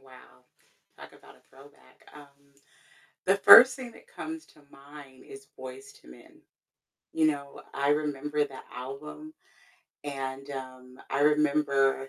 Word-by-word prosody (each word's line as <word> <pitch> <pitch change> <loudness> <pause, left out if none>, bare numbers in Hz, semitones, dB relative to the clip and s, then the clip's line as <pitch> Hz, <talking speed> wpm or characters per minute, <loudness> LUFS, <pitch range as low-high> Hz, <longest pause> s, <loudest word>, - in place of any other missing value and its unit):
Wow. 130 - -19 0.5
Talk - - -13
about - - -18
a - - -27
throwback. 140 +2 -20
Um, 140 -1 -18 0.7
the 195 +1 +4
first 250 +5 +9
thing 250 -3 -9
that - - -18
comes 320 -9 -8
to - - -22
mind 140 -2 -15
is 135 0 -14
Boyz 130 +1 -10
II - - -16
Men. 60 - -17 0.7
You 160 -1 +2
know, 140 -2 -4
I 140 +1 -1
remember 150 0 -1
that 135 -2 -12
album, 145 - -9 0.7
and, 135 -1 -6
um, 130 -1 -10
I 135 - -1
remember 145 -2 +2
140 Hz, 135 wpm, -27 LUFS, 135-150 Hz, 0.7 s, first